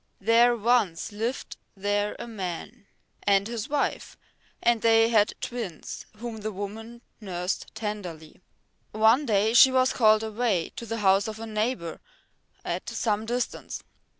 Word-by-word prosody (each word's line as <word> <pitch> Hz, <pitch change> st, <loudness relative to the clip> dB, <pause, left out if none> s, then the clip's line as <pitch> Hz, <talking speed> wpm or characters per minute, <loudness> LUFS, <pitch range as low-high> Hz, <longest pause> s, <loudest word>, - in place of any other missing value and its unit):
There 230 Hz, +4 st, +4 dB
once 220 Hz, -6 st, +1 dB
lived 225 Hz, +5 st, -4 dB, 0.2 s
there 205 Hz, +1 st, 0 dB
a -, -, -6 dB
man 200 Hz, +1 st, -6 dB, 0.3 s
and 200 Hz, 0 st, +3 dB
his 235 Hz, +3 st, -5 dB
wife, 290 Hz, -1 st, -2 dB, 0.4 s
and 235 Hz, -2 st, +2 dB
they 225 Hz, 0 st, +5 dB
had 215 Hz, -3 st, +3 dB
twins 225 Hz, -10 st, -6 dB
whom 230 Hz, 0 st, -6 dB
the 215 Hz, 0 st, -4 dB
woman 220 Hz, +4 st, -7 dB, 0.2 s
nursed 180 Hz, -3 st, -3 dB
tenderly. 185 Hz, -8 st, -6 dB, 0.5 s
One 225 Hz, +6 st, +4 dB
day 215 Hz, 0 st, +2 dB
she 260 Hz, +2 st, +8 dB
was 260 Hz, 0 st, +3 dB
called 215 Hz, -2 st, +4 dB
away 220 Hz, -5 st, -1 dB
to 235 Hz, -, -6 dB
the 225 Hz, 0 st, -3 dB
house 195 Hz, +2 st, +4 dB
of 215 Hz, -1 st, -5 dB
a 225 Hz, -, -5 dB
neighbour 215 Hz, -5 st, -2 dB, 0.7 s
at -, -, -3 dB
some 215 Hz, -1 st, -1 dB
distance. 245 Hz, +1 st, -3 dB
220 Hz, 140 wpm, -26 LUFS, 205-235 Hz, 0.7 s, she